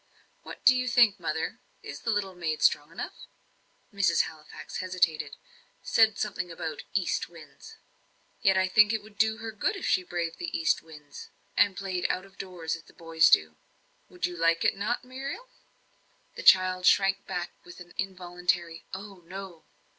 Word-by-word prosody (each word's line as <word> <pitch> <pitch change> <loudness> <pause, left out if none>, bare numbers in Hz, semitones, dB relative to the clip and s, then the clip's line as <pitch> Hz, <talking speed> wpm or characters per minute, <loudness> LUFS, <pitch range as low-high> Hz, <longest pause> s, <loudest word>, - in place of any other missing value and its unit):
What - - -11
do 255 - +8
you 255 0 0
think, 235 -5 +4
mother 165 +6 -3 0.2
is - - -7
the 230 - -4
little 205 -3 0
maid 165 -4 -3
strong 150 +2 +3
enough?" 170 - -7 0.7
Mrs. 195 -4 +3
Halifax 155 -1 -8
hesitated; 180 -4 0 0.5
said 220 -2 +4
something 190 -4 -3
about 160 -2 -5
"east 185 -4 0
winds." 155 -5 -14 0.7
"Yet 195 -4 +4
I 190 0 +3
think 210 +3 +5
it 220 -2 -2
would 210 -1 -17
do 220 0 +3
her 225 0 -6
good 305 - -1
if 390 - -5
she - - +3
braved 175 - -4
east 335 -1 0
winds, 150 -3 -12 0.3
and 200 -3 +3
played 185 -2 -2
out 185 - -2
of 195 -1 -20
doors 175 -4 -4
as 165 - -11
the - - -19
boys 165 -1 +3
do. 80 0 +4 0.5
Would 180 -1 -3
you 180 - -3
not - - -5
like 165 0 +3
it, - - +3 0.3
Muriel?" 270 - -7 0.9
The - - -6
child 185 - +5
shrank 195 0 +3
back 180 -2 -3
with 175 - -13
an 175 0 -12
involuntary 180 -3 -2
"Oh, 195 -1 -10
no." 185 -3 -9
185 Hz, 170 wpm, -28 LUFS, 170-205 Hz, 0.9 s, do